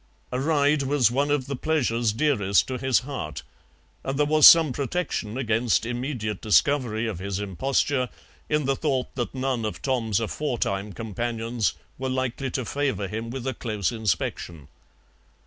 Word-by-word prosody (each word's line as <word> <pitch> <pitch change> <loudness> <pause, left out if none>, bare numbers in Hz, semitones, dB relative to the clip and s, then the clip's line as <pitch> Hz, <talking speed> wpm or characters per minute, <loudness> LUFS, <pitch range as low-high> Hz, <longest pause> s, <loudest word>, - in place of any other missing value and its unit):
A 125 - -1
ride 145 0 +2
was 135 -4 +2
one 140 +4 +1
of 145 -3 +1
the 140 +1 -4
pleasures 120 -6 +1
dearest 105 -6 +2
to 130 -1 -3
his 130 -2 +2
heart, 130 - -6 0.6
and 135 0 -3
there 150 - +3
was 155 0 +8
some 160 -5 +8
protection 135 -5 -2
against 115 -2 +1
immediate 120 -4 -3
discovery 115 0 +2
of 105 -6 -3
his 100 0 -3
imposture 125 +6 0 0.4
in 150 -2 +1
the 135 0 +1
thought 135 -3 -1
that 125 +1 -4
none 130 -3 -1
of 110 - -3
Tom's 115 -6 0
aforetime 110 -5 -2
companions 115 +1 -2 0.2
were 130 0 -2
likely 130 +1 -2
to 130 0 -3
favour 135 -6 -1
him 110 +4 -5
with 130 +1 -5
a 130 - -1
close 105 -7 -2
inspection. 90 - -3
125 Hz, 155 wpm, -25 LUFS, 110-140 Hz, 0.6 s, was